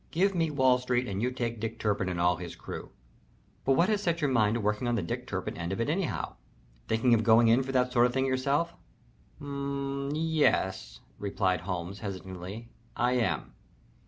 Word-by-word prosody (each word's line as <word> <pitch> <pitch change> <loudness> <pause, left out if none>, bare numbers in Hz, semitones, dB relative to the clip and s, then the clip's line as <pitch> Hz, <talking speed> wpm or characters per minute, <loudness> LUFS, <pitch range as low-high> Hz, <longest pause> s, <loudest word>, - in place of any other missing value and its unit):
Give 195 +4 +2
me 165 -3 +1
Wall 130 -3 +3
Street 125 0 0
and 100 0 -3
you 125 - +2
take 120 -3 -3
Dick 115 +1 -4
Turpin 100 -4 0
and 90 -1 -3
all 90 0 +3
his 90 -1 -7
crew. - - -7 0.8
But 135 - +4
what 170 +6 +4
has 210 -2 +1
set 170 -3 0
your 145 -4 +1
mind 110 -3 +3
to - - 0
working 105 +3 0
on 120 - +1
the 105 - -1
Dick - - -4
Turpin - - -3
end 85 +2 -4
of 95 - -3
it 115 +6 +1
anyhow? 180 +1 -2 0.5
Thinking 115 +2 +3
of 115 - +4
going 115 0 +6
in 120 +3 +5
for 135 0 -4
that 125 -1 +2
sort 120 0 +5
of 120 - -5
thing 130 0 +2
yourself?" 140 +6 +1 0.7
"M 140 -1 -3
m - - -3
m 145 - -2
yes," 95 - +1 0.2
replied 95 -2 0
Holmes, 90 +1 -4
hesitatingly. 95 +3 -7 0.2
"I 125 -1 +2
am. 110 - 0
120 Hz, 205 wpm, -29 LUFS, 100-140 Hz, 0.8 s, going